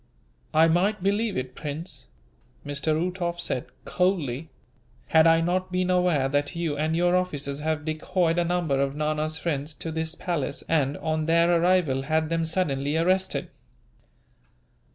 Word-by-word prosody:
"I 160 +1 +5
might 180 +4 +1
believe 205 +1 +1
it, 130 0 -4
Prince," 150 -1 -6 0.6
Mr. 145 +2 -1
Uhtoff 175 +1 -2
said, 130 -7 -3 0.2
coldly, 160 -6 0 0.6
"had 160 0 +6
I 165 0 +5
not 185 +2 -1
been 185 0 0
aware 180 -7 +2
that 145 +2 -1
you 165 -3 -1
and 155 +2 0
your 175 +1 +3
officers 145 -6 -2
have 155 0 -2
decoyed 165 +2 0
a - - +3
number 170 -6 0
of 140 0 -1
Nana's 155 +1 -1
friends 150 -1 -3
to 165 - -5
this 160 +1 -2
palace 165 -7 -2
and, 145 -3 +1
on 155 -1 -2
their 170 +1 +4
arrival, 170 -7 +2
had 155 +3 0
them 165 0 0
suddenly 150 -4 0
arrested." 185 +3 +1
160 Hz, 150 wpm, -26 LUFS, 145-175 Hz, 0.6 s, had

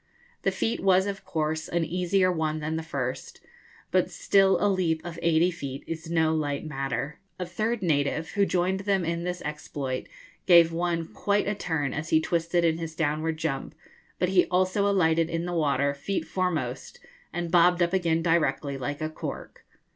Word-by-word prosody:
The - - +2
feat 225 - -1
was 190 0 +4
of 195 -1 -4
course 160 -3 -2
an 170 -1 0
easier 180 +3 +1
one 155 -2 -1
than 155 +1 -3
the 160 - -2
first; 140 -6 -4 0.5
but - - +2
still 195 -1 +3
a - - +1
leap 180 -5 +1
of 170 -1 -6
eighty 170 +2 +3
feet 140 -6 -6
is 165 0 -6
no 160 -1 +2
light 145 -2 -2
matter. 135 0 -3 0.2
A 180 - -3
third 215 +4 -2
native, 150 -1 0
who 200 - +2
joined 185 +1 +1
them 195 -2 0
in 170 +1 -2
this 180 0 -3
exploit, 145 -3 -4 0.4
gave 170 -2 +7
one 170 0 -1
quite 205 0 0
a 205 - +1
turn 160 -8 -2
as 155 +2 -4
he 160 - +5
twisted 170 +1 0
in 165 0 +1
his 160 -1 -5
downward 155 0 -1
jump; 155 -1 -3 0.4
but 180 - +1
he 185 -1 +4
also 185 +3 +2
alighted 165 -4 +2
in 165 0 -2
the 175 - -3
water 140 -3 +1
feet 165 +8 -3
foremost, 185 - -3 0.3
and 175 -1 -3
bobbed 175 0 +5
up 170 +1 0
again 165 -3 +1
directly, 155 -4 +1
like 145 +3 -4
a 155 - -1
cork. - - -7
165 Hz, 180 wpm, -27 LUFS, 155-180 Hz, 0.5 s, gave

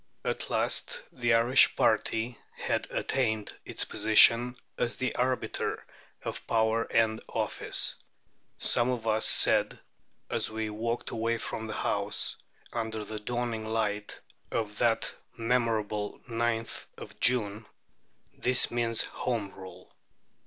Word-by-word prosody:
At - - -2
last - - 0
the 120 -1 +1
Irish 120 +3 +5
party 115 +1 0 0.2
had - - -2
attained 110 -5 -1
its - - -4
position 115 +3 +6 0.2
as 120 - -1
the 130 - -2
arbiter 125 +1 -2 0.4
of - - -6
power 110 0 +1
and 110 -1 +1
office. - - -1 0.6
Some 120 +1 +4
of 120 -3 -3
us 110 0 +3
said, - - +5 0.5
as - - -2
we 110 -1 -4
walked 115 +3 -3
away 115 +1 -1
from 110 0 -5
the 110 - -5
House, - - -1 0.4
under 110 -2 -3
the 110 +1 -6
dawning 115 0 -3
light 105 -2 -2 0.3
of 105 -2 -3
that 115 -2 +1 0.2
memorable 115 -3 -1
9th 115 -1 -2
of - - -11
June, 110 -3 0 0.7
"This 125 0 +4
means 115 -1 +1
Home 110 -6 -3
Rule." 95 -1 -13
115 Hz, 120 wpm, -28 LUFS, 110-120 Hz, 0.7 s, position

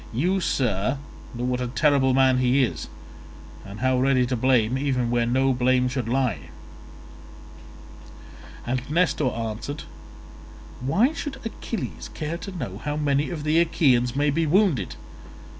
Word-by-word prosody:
You, 175 +12 +1
sir, 120 - 0 0.4
know 120 - -4
what 125 0 -1
a 125 - -1
terrible 130 0 +2
man 130 -1 +4
he 130 +2 +3
is, 120 - -3 0.8
and 100 +2 -9
how 130 0 +2
ready 130 -1 +3
to 125 +1 -1
blame 125 -1 +2
even 130 -3 0
where 120 -1 +1
no 130 +2 +2
blame 125 0 +2
should 125 -3 -3
lie." 125 -4 -1 2.2
And 125 +1 -1
Nestor 155 -3 +1
answered, 115 +5 -5 1.0
"Why 200 - +2
should 290 -4 -5
Achilles 225 0 -5
care 160 +2 -4
to 195 - -7
know 125 - -6
how 150 +4 -3
many 145 -1 +1
of 160 -4 -5
the 155 +2 +3
Achaeans 130 -7 +2
may 145 +1 +2
be 160 +2 0
wounded? 160 - +2
130 Hz, 140 wpm, -24 LUFS, 125-150 Hz, 2.2 s, man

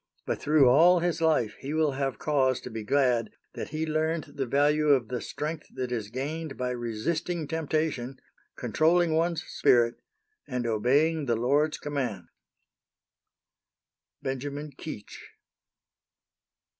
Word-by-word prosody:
But - - -2
through 150 -3 +5
all 170 +8 +6
his 175 -1 -1
life 150 -10 +2
he 140 +3 -4
will 155 -2 +2
have 135 -1 -2
cause 135 -4 +1
to 125 - -8
be 110 -1 -5
glad 125 -1 +2 0.2
that - - -6
he 155 +2 -2
learned 160 +1 0
the 135 -2 -3
value 150 +4 +2
of 130 -6 +3
the 125 -1 -3
strength 155 +1 -5
that 130 -1 -3
is 110 -4 -3
gained 145 +4 -4
by 125 0 -1
resisting 145 +8 -2
temptation, 155 -5 -2 0.4
controlling 165 +1 +2
one's 165 0 +1
spirit, 120 -1 +2 0.5
and 125 -2 -3
obeying 140 +8 +2
the 120 - +2
Lord's 145 +7 +1
commands. 130 -11 -4 1.9
BENJAMIN 145 +3 -4
KEECH. 125 -9 -8
145 Hz, 130 wpm, -28 LUFS, 125-155 Hz, 1.9 s, all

